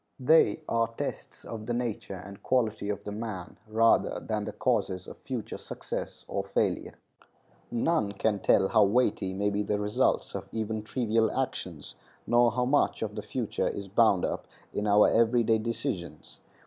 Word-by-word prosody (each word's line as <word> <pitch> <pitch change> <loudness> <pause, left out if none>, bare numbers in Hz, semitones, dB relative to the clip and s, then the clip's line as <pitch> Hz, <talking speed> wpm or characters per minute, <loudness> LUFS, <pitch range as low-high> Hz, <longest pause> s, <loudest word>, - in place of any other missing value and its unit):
They 160 +4 +4
are 115 0 +2
tests 115 - -6
of 110 -1 -7
the 120 - 0
nature 120 -5 -3
and 100 0 -11
quality 110 -5 0
of 100 -1 -3
the 105 - -5
man 105 -4 -6
rather 115 +1 +3
than 105 -2 -3
the - - -4
causes 100 -7 0
of - - -11
future 125 -5 -5
success - - -6
or - - -2
failure. - - -1 0.7
None 120 -3 +1
can 100 +1 0
tell 95 - +3
how 110 -2 +5
weighty 105 -3 +1
may 100 +2 0
be 100 +1 0
the 105 0 0
results 105 0 +1
of - - -6
even 110 -1 -2
trivial 110 0 +1
actions, 90 - -4 0.3
nor 120 +1 +4
how 125 +2 0
much 145 +3 +2
of - - -3
the - - -4
future - - -2
is 100 -1 -4
bound 100 -2 +4
up - - -4 0.3
in 105 - -1
our 105 0 +6
every 115 +1 +3
day 110 0 +3
decisions. 110 - -4
110 Hz, 170 wpm, -29 LUFS, 100-120 Hz, 0.7 s, our